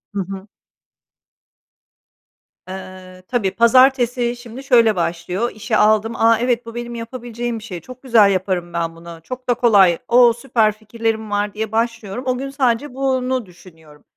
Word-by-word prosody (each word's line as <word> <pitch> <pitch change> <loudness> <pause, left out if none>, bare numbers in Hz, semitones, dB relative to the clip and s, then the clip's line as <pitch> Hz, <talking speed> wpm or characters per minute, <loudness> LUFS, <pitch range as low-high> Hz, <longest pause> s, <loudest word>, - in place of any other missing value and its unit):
Hı 195 - 0
hı. 195 +1 -8 2.2
Eee, 185 -1 -10
tabii. 230 -6 0
Pazartesi 245 +2 +3
şimdi 240 +2 -10
şöyle 230 -5 +4
başlıyor: 175 +6 -2
İşi 215 0 -2
aldım, 215 +2 +3
"A, 225 0 +4
evet 245 -1 0
bu 230 - -10
benim 240 0 -6
yapabileceğim 235 0 -5
bir - - -14
şey, 180 -6 -7
çok 255 +1 -13
güzel 220 -6 +5
yaparım 185 -2 -2
ben 165 -1 -2
bunu, 170 0 -11
çok 255 +3 -8
da - - +5
kolay. 200 -8 +4
O, 240 -1 +6
süper 230 -3 +1
fikirlerim 220 0 -4
var." 205 0 -1
diye 220 0 -4
başlıyorum. 230 0 -2
O 250 -1 0
gün, 275 +1 -5
sadece 260 0 0
bunu 260 -2 -1
düşünüyorum. 160 -4 -18
225 Hz, 150 wpm, -19 LUFS, 195-245 Hz, 2.2 s, O